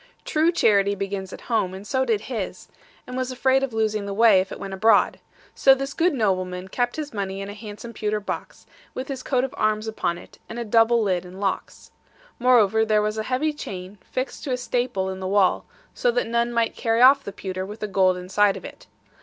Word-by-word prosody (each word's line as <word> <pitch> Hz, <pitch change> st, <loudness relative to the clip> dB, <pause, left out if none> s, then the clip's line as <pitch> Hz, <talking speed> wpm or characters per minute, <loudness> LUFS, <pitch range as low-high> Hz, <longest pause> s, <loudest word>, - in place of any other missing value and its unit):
True 315 Hz, +2 st, +2 dB
charity 200 Hz, -, +3 dB
begins 195 Hz, -1 st, -4 dB
at -, -, -9 dB
home, 190 Hz, -6 st, -1 dB
and 195 Hz, +2 st, -9 dB
so 260 Hz, +3 st, 0 dB
did 225 Hz, -4 st, +1 dB
his; 220 Hz, -6 st, -5 dB, 0.4 s
and 250 Hz, -, -7 dB
was 255 Hz, 0 st, -2 dB
afraid 265 Hz, +1 st, +2 dB
of 270 Hz, -2 st, -2 dB
losing 215 Hz, -2 st, -1 dB
the 200 Hz, -, -4 dB
way, 215 Hz, -3 st, +6 dB
if 185 Hz, -, -6 dB
it -, -, -7 dB
went 195 Hz, -1 st, -6 dB
abroad. 220 Hz, +4 st, +3 dB, 0.3 s
So 270 Hz, -1 st, +5 dB
this 275 Hz, +1 st, -4 dB
good 340 Hz, -2 st, +2 dB
nobleman 185 Hz, -4 st, -1 dB
kept 245 Hz, +4 st, -1 dB
his 300 Hz, -4 st, -5 dB
money 195 Hz, -2 st, -3 dB
in 195 Hz, 0 st, -5 dB
a -, -, -6 dB
handsome 215 Hz, +2 st, -9 dB
pewter 215 Hz, -1 st, -1 dB
box, 205 Hz, -, -6 dB, 0.3 s
with 260 Hz, +2 st, -5 dB
his 270 Hz, -2 st, -4 dB
coat 255 Hz, -1 st, 0 dB
of 265 Hz, -, -3 dB
arms 215 Hz, 0 st, +1 dB
upon 195 Hz, -5 st, -2 dB
it, -, -, -15 dB
and 230 Hz, -, -7 dB
a 235 Hz, -, -3 dB
double 225 Hz, +1 st, +4 dB
lid 185 Hz, -4 st, 0 dB
and 180 Hz, +1 st, -11 dB
locks. 195 Hz, -1 st, -3 dB, 0.5 s
Moreover, 220 Hz, -3 st, +4 dB
there 215 Hz, -1 st, +2 dB
was 215 Hz, +1 st, -1 dB
a 215 Hz, -, -4 dB
heavy 295 Hz, +4 st, 0 dB
chain, 190 Hz, -7 st, -8 dB
fixed 255 Hz, +1 st, -4 dB
to 275 Hz, -, -3 dB
a 250 Hz, -, +1 dB
staple 245 Hz, -5 st, -1 dB
in 190 Hz, 0 st, -5 dB
the 190 Hz, -, -4 dB
wall, 195 Hz, -1 st, +2 dB, 0.3 s
so 245 Hz, -, +1 dB
that 245 Hz, +1 st, +1 dB
none 235 Hz, +1 st, 0 dB
might 230 Hz, -1 st, 0 dB
carry 230 Hz, +1 st, +2 dB
off 275 Hz, +2 st, +7 dB
the 200 Hz, -, -6 dB
pewter 185 Hz, -1 st, -5 dB
with 210 Hz, +3 st, -8 dB
the 210 Hz, -, -3 dB
gold 185 Hz, -2 st, +2 dB
inside 195 Hz, +2 st, +2 dB
of -, -, -10 dB
it. -, -, -11 dB
215 Hz, 225 wpm, -24 LUFS, 195-250 Hz, 0.5 s, off